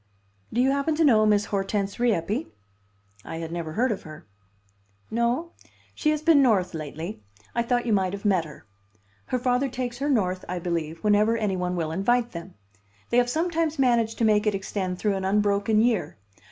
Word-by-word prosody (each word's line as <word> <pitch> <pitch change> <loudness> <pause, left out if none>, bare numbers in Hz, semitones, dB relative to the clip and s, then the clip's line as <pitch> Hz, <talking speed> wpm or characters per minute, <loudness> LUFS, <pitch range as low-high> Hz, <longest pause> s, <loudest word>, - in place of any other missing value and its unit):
Do 245 - +1
you 265 +1 +3
happen 280 +3 0
to 325 - +2
know 220 -7 +5
Miss 210 0 +3
Hortense 200 +1 -2
Rieppe?" 210 - 0 0.8
I - - -7
had 165 0 -5
never 165 -2 -4
heard 245 +5 +1
of 205 - -3
her. 155 -1 -11 0.9
"No? 240 +9 0 0.4
She 305 - 0
has 305 0 0
been 310 -3 +6
North 200 -9 +2
lately. 160 - -6 0.3
I 235 - +1
thought 240 +1 0
you 230 - +1
might 190 -2 +1
have 200 +1 -7
met 185 -5 +2
her. 150 -2 -13 0.6
Her 255 - 0
father 250 +2 +1
takes 245 -1 -4
her 285 +2 -1
North, 185 -8 +1
I 180 - -2
believe, 165 -2 -3
whenever 210 +2 +3
any 210 -4 0
one 180 0 -2
will 160 -3 -2
invite 240 +7 +1
them. 170 +2 -9 0.6
They 235 - +3
have 245 0 +3
sometimes 325 +1 0
managed 235 -4 +2
to 230 - +2
make 215 0 +3
it 210 - +2
extend 190 -2 -3
through 205 +1 0
an 190 -1 -3
unbroken 205 +2 +2
year. 235 -4 0
210 Hz, 190 wpm, -25 LUFS, 185-245 Hz, 0.9 s, been